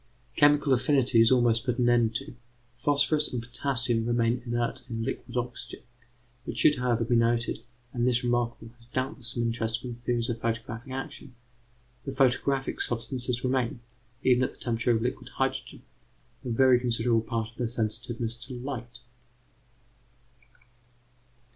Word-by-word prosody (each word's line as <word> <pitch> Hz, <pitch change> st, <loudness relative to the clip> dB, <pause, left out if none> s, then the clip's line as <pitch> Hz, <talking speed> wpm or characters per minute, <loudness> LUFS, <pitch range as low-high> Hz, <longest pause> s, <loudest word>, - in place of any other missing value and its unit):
Chemical 145 Hz, -1 st, +5 dB
affinity 130 Hz, -2 st, +4 dB
is 115 Hz, -, +5 dB
almost 120 Hz, -3 st, +3 dB
put 125 Hz, -2 st, -1 dB
an 125 Hz, -2 st, +2 dB
end 120 Hz, -2 st, +3 dB
to; 135 Hz, +3 st, -4 dB, 0.4 s
phosphorus 145 Hz, +3 st, +2 dB
and 125 Hz, -, -2 dB
potassium 120 Hz, 0 st, +1 dB
remain 120 Hz, +1 st, +1 dB
inert 120 Hz, 0 st, -1 dB
in 115 Hz, -1 st, -3 dB
liquid 125 Hz, 0 st, -4 dB
oxygen. 120 Hz, 0 st, -5 dB, 0.7 s
It -, -, -4 dB
should, 150 Hz, -, +4 dB
however, 125 Hz, -2 st, +1 dB
be 120 Hz, +1 st, +1 dB
noted, 115 Hz, 0 st, +1 dB, 0.3 s
and 120 Hz, -1 st, +1 dB
this 125 Hz, -1 st, +2 dB
remark 120 Hz, -1 st, +1 dB, 0.2 s
has 115 Hz, -1 st, -11 dB
doubtless 130 Hz, 0 st, -3 dB
some 120 Hz, 0 st, -1 dB
interest 115 Hz, 0 st, -1 dB
for 125 Hz, -, -6 dB
the -, -, -5 dB
theories 120 Hz, 0 st, -1 dB
of 115 Hz, -1 st, -3 dB
photographic 115 Hz, +2 st, -4 dB
action, 135 Hz, 0 st, -7 dB, 0.7 s
that 135 Hz, -1 st, -5 dB
photographic 135 Hz, +1 st, +1 dB
substances 120 Hz, +1 st, -2 dB
retain, 125 Hz, -2 st, 0 dB, 0.4 s
even 125 Hz, 0 st, +4 dB
at -, -, -2 dB
the -, -, -20 dB
temperature 115 Hz, 0 st, -1 dB
of 115 Hz, -2 st, +3 dB
liquid 125 Hz, -, -3 dB
hydrogen, -, -, -2 dB, 0.6 s
a 125 Hz, -, -5 dB
very 125 Hz, +1 st, +5 dB
considerable 115 Hz, -1 st, +2 dB
part 115 Hz, 0 st, -3 dB
of -, -, -26 dB
their 120 Hz, -, -1 dB
sensitiveness 115 Hz, +1 st, -2 dB
to 125 Hz, +2 st, -8 dB
light. 125 Hz, -1 st, -6 dB
120 Hz, 150 wpm, -28 LUFS, 115-130 Hz, 0.7 s, Chemical